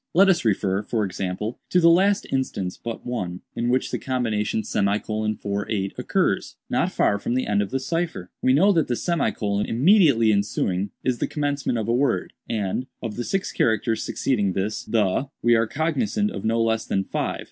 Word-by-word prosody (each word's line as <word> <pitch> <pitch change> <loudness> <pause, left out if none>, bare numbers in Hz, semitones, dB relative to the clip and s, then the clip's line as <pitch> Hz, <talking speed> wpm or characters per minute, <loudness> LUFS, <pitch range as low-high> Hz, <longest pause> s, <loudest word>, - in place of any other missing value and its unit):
Let 195 +2 +6
us 180 - +3
refer, 100 -3 +1
for 105 0 -1
example, 95 +4 -4
to 180 - +4
the 170 - +5
last 195 +4 +3
instance 100 -9 -2
but 115 -1 -7
one, 90 -8 -4
in 120 - -1
which 130 +1 +1
the - - -2
combination 110 -5 -1
;48 105 -1 -1
occurs—not - - -1
far 100 - +2
from 120 - -2
the 130 - 0
end 105 0 +1
of 100 - -2
the 135 - -1
cipher. 160 - -3
We 130 - +3
know 190 +9 +5
that 165 -5 +2
the; 115 - 0
immediately 135 - +4
ensuing 100 -1 0
is 125 -2 0
the - - 0
commencement 145 -4 -1
of 110 -1 -2
a 115 - +1
word, 135 +3 0 0.2
and, 110 +3 -2 0.2
of 115 -3 -4
the 120 - -3
six 195 +9 -2
characters 110 0 +1
succeeding 105 -8 0
this 100 +3 -2
'the,' 110 +4 0
we 120 - +5
are 115 -1 +3
cognizant 205 - 0
of - - -6
no 115 +1 +1
less 110 0 +1
than 95 - -1
five. - - -3
115 Hz, 180 wpm, -24 LUFS, 105-135 Hz, 0.2 s, Let